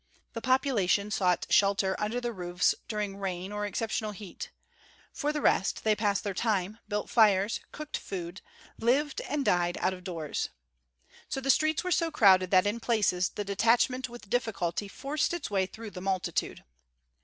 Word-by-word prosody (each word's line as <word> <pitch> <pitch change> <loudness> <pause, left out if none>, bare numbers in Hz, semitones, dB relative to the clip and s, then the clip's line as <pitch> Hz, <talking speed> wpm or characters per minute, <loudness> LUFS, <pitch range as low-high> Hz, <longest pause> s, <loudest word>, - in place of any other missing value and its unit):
The 230 - -5
population 225 -7 +2
sought 180 -4 +1
shelter 195 -1 +3
under 215 +4 -1
the 240 -1 -3
roofs 180 -2 +1
during 210 -3 -3
rain 190 -1 -4
or 210 0 -2
exceptional 215 +1 -2
heat; 200 -1 -8 0.6
for 295 0 -1
the 300 -1 -3
rest 195 - +2
they 215 -1 +3
passed 205 -1 0
their 200 - -2
time, 210 +1 -1
built 210 0 -2
fires, 210 -2 +3
cooked 305 0 -5
food, 180 -1 -6 0.4
lived, 270 +5 +1
and 290 -2 -2
died 175 0 +2
out 185 - +1
of 180 -1 -10
doors. 165 -5 -3 0.8
So - - -2
the 270 +1 +3
streets 310 +3 +2
were 365 - -2
so 335 -1 +2
crowded 190 - +5
that 185 0 +5
in 210 +3 0
places 205 -6 +1
the 205 - -4
detachment 235 +5 +2
with 240 -3 -11
difficulty 205 -5 -1
forced 285 +10 -2
its 320 -10 -5
way 190 -2 +1
through 220 +1 -9
the 180 - -8
multitude. 190 -1 -2
210 Hz, 165 wpm, -29 LUFS, 190-240 Hz, 0.8 s, crowded